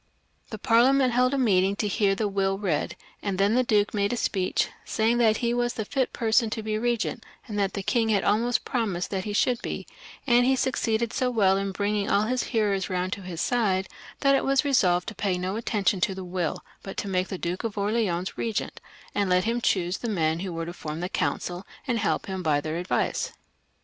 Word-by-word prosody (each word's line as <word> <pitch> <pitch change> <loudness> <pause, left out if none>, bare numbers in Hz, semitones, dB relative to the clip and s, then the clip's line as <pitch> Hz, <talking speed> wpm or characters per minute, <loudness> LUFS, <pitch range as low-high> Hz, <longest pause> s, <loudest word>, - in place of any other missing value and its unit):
The 215 - -6
Parliament 250 +4 +4
held 250 +1 +3
a 280 - 0
meeting 195 -6 +3
to 210 - -1
hear 200 -1 +2
the 210 +1 0
will 195 -1 0
read, 185 -7 -1 0.3
and 195 -2 -2
then 200 +3 +3
the 250 - +4
duke 210 -3 +2
made 200 -1 +1
a 245 - -1
speech, 190 -5 0 0.2
saying 230 +2 +1
that 220 -2 +4
he 235 - +2
was 240 0 0
the 220 - -3
fit 260 +3 -1
person 225 0 +2
to 220 0 -4
be 215 0 -2
regent, 235 0 -1 0.2
and 210 -2 -3
that 200 -1 0
the 200 - -4
king 225 +1 +1
had 205 -3 +2
almost 235 +4 +1
pro 240 -3 0
mised 180 -2 -3
that 190 -2 -3
he 210 - -3
should 240 +3 +2
be, - - -4 0.4
and 245 -2 +5
he 265 +2 +3
succeeded 235 -3 0
so 255 - +1
well 200 -6 +3
in 195 0 -1
bring 205 +2 -1
ing 205 +1 -1
all 205 - +3
his 250 +3 0
hearers 210 -5 0
round 185 0 -1
to 200 - -6
his 180 -3 -5
side, 195 -6 +1 0.3
that 275 -1 +4
it 275 - +3
was 275 +1 +2
resolved 180 -11 +3
to - - -9
pay 195 -2 -1
no 185 +2 -2
attention 205 -4 0
to 190 +2 +1
the 190 -1 -6
will, 175 -3 -3 0.2
but 195 - -8
to - - -2
make 185 -1 0
the 190 - -5
Duke 175 +3 -3
of 225 -3 -4
Orleans 200 -4 -1
regent, 225 -3 -3 0.3
and 200 -2 0
let 180 0 +3
him 235 +2 0
choose 180 -4 +1
the 235 - -3
men 160 -5 +1
who 185 0 -4
were 165 0 -4
to 170 - -6
form 155 -1 -6
the 180 - -2
council 175 +3 -2 0.2
and 245 -5 0
help 205 - 0
him 190 -1 -4
by 155 -4 +2
their 155 +2 -3
advice. 180 +1 -1
205 Hz, 230 wpm, -26 LUFS, 185-235 Hz, 0.4 s, and